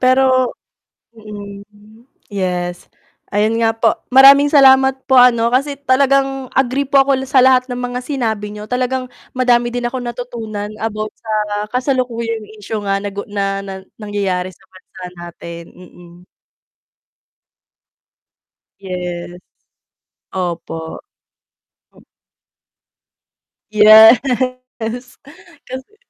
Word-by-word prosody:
Pero 255 0 +3 0.6
mm, 210 +1 -12 0.3
yes 180 -3 -4 0.4
ayun 215 +3 0
nga 225 0 +1
po. 225 0 +2 0.2
Maraming 275 +2 +7
salamat 265 -2 +4
po 265 -2 +5
ano, 235 -1 +4
kasi 280 +2 0
talagang 270 -1 +1
agree 265 +1 0
po 275 -1 +4
ako 280 - +1
l 265 - -7
sa 260 -2 +4
lahat 260 0 +4
ng 245 - -4
mga 245 0 -4
sinabi 225 -6 -3
niyo, 210 0 -8
talagang 255 +3 -2 0.3
madami 245 -1 +2
din 245 0 -4
akong 255 +2 -3
natutunan 225 -4 -6
about 215 -1 -4
sa 225 - -19 0.4
kasalukuyang 235 -4 -2
issue 210 +1 -5
nga 195 - +1
nagu 200 0 -6
na 195 -1 -2
nang 190 -1 -8 0.2
nangyayari 195 -3 -2
sa 185 - -17
bansa 185 0 -16 0.2
natin. 170 0 -9
Mm. 175 -1 -16 2.7
Yes. 180 -2 -6 0.9
Opo. 170 -3 -5 0.9
O - - -21 1.7
Yes, 220 +2 +8 1.5
kasi 260 +1 -8
mm. 425 - -27
225 Hz, 105 wpm, -17 LUFS, 200-255 Hz, 2.7 s, Yes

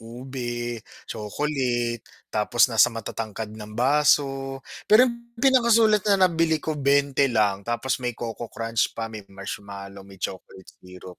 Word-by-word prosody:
ube, 120 0 -5 0.3
chocolate, 120 +1 -2 0.3
tapos 120 +4 +2
nasa 110 -4 +5
matatangkad 110 -1 -5
ng 105 -1 -10
baso, 135 0 +2 0.3
pero 220 +4 +8
yung 235 -1 -6
pinakasulit 230 -4 +4
na 195 -2 +5
nabili 165 -3 +1
ko 155 -2 -3
20 140 0 +3
lang 105 -5 0
tapos 120 +3 -1
may 120 -1 -2
coco 115 0 -5
crunch 115 -1 -2
pa 115 0 -4
may 105 -3 -9
marshmallow, 100 0 -8
may 100 - -14
chocolate 95 0 -7
syrup. 90 0 -13
120 Hz, 135 wpm, -24 LUFS, 105-145 Hz, 0.3 s, pero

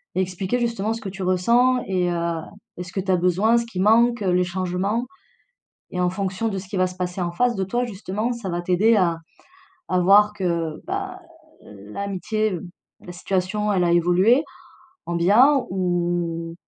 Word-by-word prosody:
et 190 - +2
expliquer, 185 +6 -2
justement, 225 -2 -1
ce 225 - -7
que 195 - -5
tu 190 +1 -9
ressens 235 +8 +3
et 180 -2 0
heu 170 -1 -2 0.4
et 180 - -4
ce 180 - -11
que 195 - -2
tu 190 0 -1
as 180 - +3
besoin, 190 +7 +2
ce 235 - -4
qui 185 -6 -6
manque, 230 +3 +4
les 180 -1 +2
changements. 185 +6 -2 0.9
Et 180 - -5
en 180 0 +2
fonction 195 +3 -2
de 195 -2 -3
ce 185 0 -9
qui 195 - -5
va 185 0 +3
se 180 - -7
passer 180 0 -3
en 175 -1 -2
face 245 +6 +1
de 190 - -1
toi, 240 +6 -1
justement, 215 +2 -3
ça 210 -6 -5
va 175 - -2
t'aider 200 +6 +3
à 175 -4 +2 0.7
à 185 - +1
voir 205 +3 +5
que, 170 -5 -2
bah, 385 -1 -4 0.4
l'amitié, 195 - -3 0.4
la 180 - -10
situation, 195 +3 -1
elle 180 -2 +2
a 170 - +2
évolué, 180 - +4 0.6
en 170 - -3
bien 245 +10 +4
ou 175 -2 -1
190 Hz, 185 wpm, -22 LUFS, 180-220 Hz, 0.9 s, voir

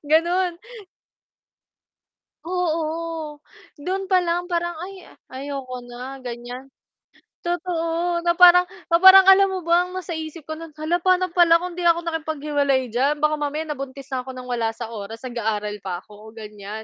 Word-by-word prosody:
ganun. 345 +2 +2 1.9
Oo. 330 -3 -2 0.4
Do'n 375 +6 -4
pa 375 - +4
lang 350 +1 -1
parang 345 -1 -1
"Ay, 375 +1 -9 0.2
ayoko 260 -2 -6
na", 250 +2 -8
gan'yan. 245 +2 -8 0.7
Totoo, 345 0 -1
na 345 0 +2
parang 360 0 +7 0.2
na 335 - +5
parang 380 +1 +10
alam 390 +1 +7
mo 375 - -2
ba 345 +2 +3
ang 365 - -10
nasa 370 -1 -5
isip 315 0 -7
ko 315 0 -5
no'n 330 -1 -9
"hala 310 +3 -1
pa'no 370 0 +2
pala 340 -1 +5
kung 360 +1 -5
'di 350 -1 0
ako 340 0 +3
nakipaghiwalay 290 -5 -1
diyan 270 +6 +1
baka 305 +1 +2
mamaya 295 +1 -2
nabuntis 275 -2 -6
na 260 - -1
ako 260 - -5
ng 255 - -8
wala 230 -2 -1
sa 230 -1 -7
oras 220 +2 -8
nag-aaral 215 -4 -3
pa 180 -2 -4
ako", 215 +1 -15
gan'yan. 210 0 -8
315 Hz, 155 wpm, -22 LUFS, 255-350 Hz, 1.9 s, parang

